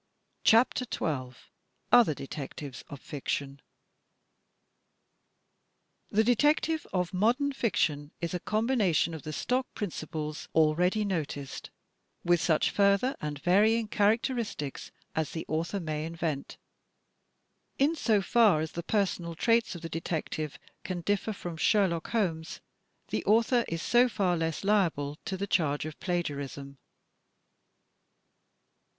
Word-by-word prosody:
CHAPTER 235 +3 +4
XII 130 -5 -2 0.6
OTHER 235 -11 +6
DETECTIVES 135 0 -7
OF 140 - -8
FICTION 140 -1 -4 2.5
The 215 +2 +3
detective 295 +6 +2
of 180 -1 -1
modern 240 +9 +2
fiction 150 - 0
is 170 0 -3
a 180 - -1
combination 215 - +1
of 160 - -6
the 155 - -6
stock 250 - -1
principles 155 -5 -5
already 175 +7 +3
noticed 145 -7 -4 0.5
with 175 -1 +3
such 155 -3 +2
further 200 +6 +3
and 150 -1 -3
vary 205 +5 +5
ing 225 -2 -3
characteristics 215 - 0 0.3
as 160 -1 -1
the 160 - -4
author 165 +5 -1
may 155 -3 -3
invent. 165 -4 -4 1.2
In 285 +4 +3
so 215 -9 +2
far 215 -7 +4
as 155 0 -3
the 170 - -4
personal 175 -3 -1
traits 230 +2 +2
of 170 - -9
the - - -3
detective 155 -2 -3 0.3
can 180 -2 -4
differ 205 +4 0
from 175 -5 -6
Sherlock 175 -2 +2
Holmes, 165 -8 -1 0.5
the 110 - -2
author 230 +3 +3
is 165 0 -3
so 245 +1 +4
far 185 -4 +1
less 165 +1 -2
liable 165 -8 +1
to 190 - -3
the 200 - -2
charge 150 -7 +1
of 155 -1 -7
plagiarism. 140 -6 -4
175 Hz, 120 wpm, -29 LUFS, 155-215 Hz, 2.5 s, OTHER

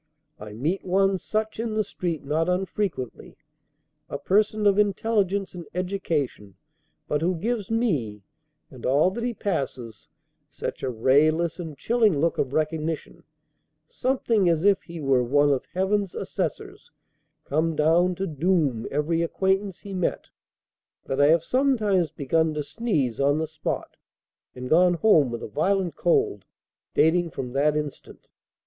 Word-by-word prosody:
I 105 0 -9
meet 155 - -2
one 195 +1 +2
such 215 +2 -3
in 225 -1 -2
the 215 - +2
street 170 -6 -4
not 160 +4 0
unfrequently, 180 - -3 0.7
a - - -3
person 210 +5 +1
of 200 0 +4
intelligence 200 -1 +1
and 175 -3 -8
education, 160 - -2 0.5
but 150 - 0
who 180 +2 +1
gives 210 +3 -2
me 150 - -1 0.5
(and 130 -3 -12
all 145 +8 +3
that 230 +4 -5
he 240 -1 -2
passes) 130 - -4 0.4
such - - -6
a 130 - -1
rayless 155 +8 +2
and 160 -5 -7
chilling 220 - +2
look 165 +3 0
of 130 - 0
recognition, 155 +1 -2 0.7
something 230 -6 +1
as 165 +1 +1
if 200 -1 +4
he 170 -1 -9
were 135 -4 +2
one 145 +4 +3
of 135 - 0
Heaven's 190 0 0
assessors, - - -4 0.6
come 160 +3 0
down 170 +4 +3
to 195 - -2
"doom" 155 -7 0
every 155 +4 0
acquaintance 190 +2 0
he 200 - -8
met, 180 -2 -2 0.8
that 135 +1 -1
I 145 - +6
have 165 +1 +4
sometimes 215 - +2
begun 155 +2 0
to 150 - -2
sneeze 150 - -1
on 140 +1 +3
the 160 - 0
spot, 155 0 -5 0.6
and 125 0 -6
gone 175 +4 +4
home 160 - +4
with 120 -1 -5
a - - -4
violent 185 - 0
cold, 420 -4 +1 0.5
dating 170 +2 +3
from 125 -5 -6
that 150 +2 +2
instant. 150 -2 -7
170 Hz, 145 wpm, -25 LUFS, 145-195 Hz, 0.8 s, I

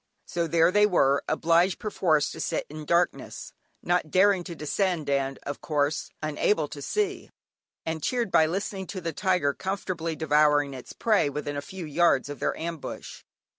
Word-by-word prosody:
So 170 -1 -2
there 165 +1 +4
they 210 +2 +5
were, 140 -8 +3
obliged, 170 +3 +2
perforce, 175 -9 +1
to - - -9
sit - - -2
in 155 0 -7
darkness, 170 +3 -1 0.3
not 175 -2 +1
daring 190 +1 +4
to 170 - -6
descend, 165 +1 -1
and 135 -1 0
of 145 - -5
course 150 -1 0
unable 155 +2 +1
to 145 - -8
see, 395 - -2 0.6
and 160 -1 -3
cheered 235 - -1
by 160 - +5
listening 190 +2 -3
to 185 - -6
the 165 -1 -3
tiger 180 -5 +1
comfortably 185 -3 -3
devouring 150 -2 +3
its 130 -2 -9
prey, 215 -10 +2
within 145 0 -4
a 140 - -2
few 185 +3 -8
yards 155 -2 +2
of 145 - -7
their - - -1
ambush. 165 -2 -6
165 Hz, 170 wpm, -27 LUFS, 150-185 Hz, 0.6 s, they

